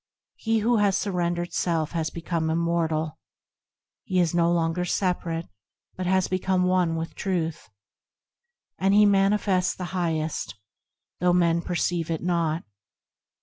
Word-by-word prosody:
He 225 -1 0
who 235 +2 +3
has 200 -2 +3
surrendered 175 -3 -2
self 165 -3 0
has 165 -2 -1
become, 165 -1 -2
immortal, 160 -2 0 0.8
He 185 - 0
is 175 -2 +2
no 170 0 +3
longer 170 +1 0
separate 175 -2 -1 0.5
but 185 -1 -3
has 190 0 +2
become 185 0 0
one 180 -2 +2
with 165 +1 -4
Truth, 170 -5 -3 1.1
And 195 +1 +3
he 210 0 +7
manifests 195 -2 +2
the 180 0 -6
Highest, 160 -4 -2 0.6
though 180 0 +3
men 170 -1 +3
perceive 175 -1 -1
it 165 0 -2
not. 170 -2 0
175 Hz, 130 wpm, -25 LUFS, 165-185 Hz, 1.1 s, he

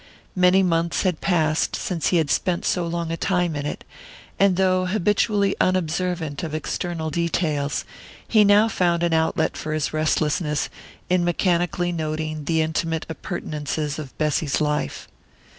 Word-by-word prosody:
Many 185 +1 +5
months 170 -1 +1
had 180 -4 0
passed 160 -4 +1
since 170 -4 -2
he 180 - +3
had 155 -4 +1
spent 180 -2 0
so 175 -2 0
long 170 -1 -3
a 165 - -2
time 175 -4 0
in 145 0 -3
it, - - -5 0.6
and 195 -2 +4
though 185 -1 +2
habitually 205 +1 +1
unobservant 175 -3 0
of 155 -2 -4
external 160 0 -3
details, 155 -3 -1 0.4
he 215 -2 +5
now 205 +2 +5
found 175 -5 +1
an 170 -1 +1
outlet 160 0 +1
for 155 - -4
his 155 -1 -1
restlessness 155 0 0 0.4
in 180 -1 +2
mechanically 175 0 +1
noting 155 -2 -3
the 160 0 +2
intimate 160 0 -2
appurtenances 150 -1 -4
of 140 -4 -9
Bessy's 150 -1 0
life. 150 -1 -2
165 Hz, 145 wpm, -23 LUFS, 155-180 Hz, 0.6 s, Many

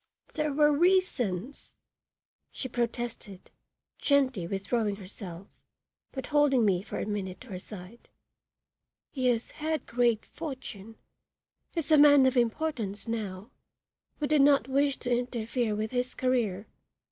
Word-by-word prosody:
"There 305 -2 -1
were 295 +1 +4
reasons," 285 - +1 0.8
she 260 - -4
protested, 235 -5 -4 0.5
gently 260 - +2
withdrawing 205 +3 -1
herself, 190 -2 -9 0.7
but 265 -2 -5
holding 280 -5 +4
me 185 -3 +2
for 200 - -6
a - - -2
minute 200 -3 -4
to 260 - -12
her 185 -3 -5
side. 205 +3 -12 1.0
"He 260 -3 -1
has 235 -2 0
had 310 -2 -3
great 235 -2 +1
fortune 255 -9 -8 0.8
is 330 -2 -1
a 305 - +7
man 285 -2 +8
of 260 0 +2
importance 235 -5 -1
now 210 -1 -4 0.7
we 295 - 0
did 300 -1 +4
not 275 -2 +5
wish 275 +1 +2
to 245 -1 0
interfere 240 -2 -1
with 215 +1 -3
his 250 0 -1
career. 230 -6 0
245 Hz, 130 wpm, -29 LUFS, 210-280 Hz, 1.0 s, man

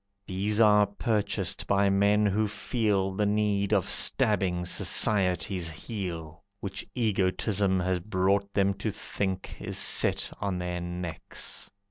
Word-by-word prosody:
These 100 +3 -1
are 105 -2 +5
purchased 100 -3 -2
by 100 0 +3
men 100 +2 +3
who 105 +2 +1
feel 105 -3 -1
The 105 +2 0
need 105 -1 0
of 100 -4 +2
stabbing 90 -4 +2
society's 90 -1 +2
heel, 85 -3 -6 0.2
Which 95 -1 -5
egotism 100 -3 +1
has 90 0 0
brought 100 +1 0
them 100 -1 +2
to 110 - -2
think 95 -2 -4
Is - - -5
set - - +2
on 100 -3 -1
their 90 0 -3
necks. 85 -1 -6
100 Hz, 125 wpm, -28 LUFS, 90-105 Hz, 0.2 s, are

